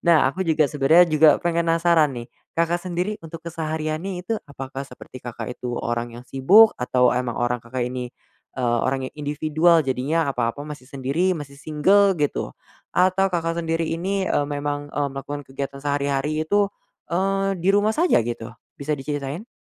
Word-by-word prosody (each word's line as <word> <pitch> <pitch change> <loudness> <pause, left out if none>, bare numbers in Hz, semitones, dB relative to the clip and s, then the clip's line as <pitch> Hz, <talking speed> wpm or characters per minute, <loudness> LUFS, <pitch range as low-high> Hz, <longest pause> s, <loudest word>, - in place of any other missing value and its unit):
Nah, 170 -3 +5
aku 170 +8 -5
juga 160 -2 +3
sebenarnya 155 +5 +5
juga, 155 0 +5
penasaran 165 -3 +2
nih, 120 0 -6 0.3
Kakak 170 +1 +1
sendiri 180 +3 -2
untuk 165 0 -8
kesehariannya 160 +2 -3
itu 225 +2 -1
apakah 135 -1 -7
seperti 130 -1 -12
Kakak 115 -2 -6
itu 120 -1 -4
orang 120 0 -3
yang 120 - -11
sibuk, 195 - +6
atau 125 0 +3
emang 125 -1 -2
orang 120 0 0
Kakak 120 +1 -3
ini, 125 0 -4 0.5
eee, 120 -2 +1
orang 135 0 0
yang - - -52
individual, 155 +2 +2
jadinya 140 +5 0
apa-apa 120 +4 -2
masih 150 -4 -9
sendiri, 145 +7 0
masih 140 -1 -9
single 190 +6 +3
gitu, 145 -2 -2 0.3
atau 185 +1 +3
Kakak 170 -2 -1
sendiri 165 0 -1
ini, 190 +4 -1
eee, 145 - +1
memang, 145 0 -3
eee, 145 -1 -1
melakukan 140 +2 -5
kegiatan 140 +1 -6
sehari-hari 145 +2 -1
itu, 205 +4 +2 0.4
eee, 195 +2 0
di 180 +1 -2
rumah 210 +4 +2
saja 340 - +4
gitu, 115 0 -5 0.2
bisa 145 +2 -3
diceritain? 145 - -4
150 Hz, 160 wpm, -23 LUFS, 135-170 Hz, 0.5 s, sibuk